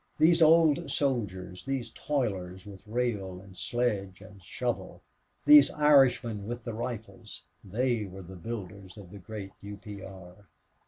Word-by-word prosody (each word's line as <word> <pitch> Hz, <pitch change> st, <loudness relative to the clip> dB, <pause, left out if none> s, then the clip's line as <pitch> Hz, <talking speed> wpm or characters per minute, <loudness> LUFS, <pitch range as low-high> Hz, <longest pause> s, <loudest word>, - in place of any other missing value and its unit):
These 165 Hz, +2 st, +5 dB
old 160 Hz, -1 st, +5 dB
soldiers, 95 Hz, -11 st, -2 dB
these 130 Hz, -4 st, -3 dB
toilers 95 Hz, -11 st, -3 dB
with 100 Hz, -2 st, -11 dB
rail 105 Hz, -6 st, -2 dB
and 95 Hz, 0 st, -15 dB
sledge 100 Hz, -5 st, -2 dB
and 100 Hz, 0 st, -14 dB
shovel, -, -, -4 dB, 0.4 s
these 150 Hz, -1 st, +9 dB
Irishmen 130 Hz, -8 st, +3 dB
with 120 Hz, 0 st, -5 dB
the 115 Hz, -, -5 dB
rifles, 115 Hz, -1 st, -7 dB, 0.2 s
they 115 Hz, +2 st, 0 dB
were 95 Hz, 0 st, -9 dB
the 95 Hz, +2 st, -11 dB
builders 100 Hz, -1 st, -7 dB
of 95 Hz, -4 st, -12 dB
the 100 Hz, -, -10 dB
great 100 Hz, 0 st, -8 dB
U. 100 Hz, 0 st, -8 dB
P. 100 Hz, 0 st, -9 dB
R. 95 Hz, +1 st, -12 dB
105 Hz, 145 wpm, -29 LUFS, 95-125 Hz, 0.4 s, these